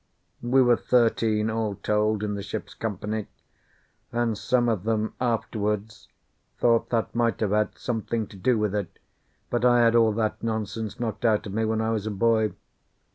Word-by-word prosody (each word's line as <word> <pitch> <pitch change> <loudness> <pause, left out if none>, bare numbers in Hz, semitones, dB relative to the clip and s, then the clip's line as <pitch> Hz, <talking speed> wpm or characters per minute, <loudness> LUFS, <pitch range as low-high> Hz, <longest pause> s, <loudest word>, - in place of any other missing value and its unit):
We 130 +2 +4
were 120 -1 +4
thirteen, 110 -2 +2
all 110 -2 -1
told, 105 +1 0
in 105 -1 -1
the 100 - -4
ship's 100 - -6
company; 105 0 -4 0.8
and 120 -2 0
some 120 +3 +1
of 110 -6 0
them 110 0 -1
afterwards 110 -3 -2 0.5
thought 115 -1 +2
that 115 -2 -1
might 115 -1 +1
have 105 -3 +1
had 105 0 0
something 115 -1 -2
to - - -13
do 115 +6 +1
with 105 -2 0
it, 100 -4 -3 0.5
but 120 0 0
I 120 -1 +5
had 115 0 +4
all 115 -2 +5
that 110 0 -1
nonsense 110 0 -3
knocked 115 -1 -3
out 110 -3 +2
of 100 - -6
me 110 +1 0
when 110 0 0
I 110 0 0
was 110 -1 -2
a - - -1
boy. 110 +1 +2
110 Hz, 180 wpm, -26 LUFS, 105-115 Hz, 0.8 s, I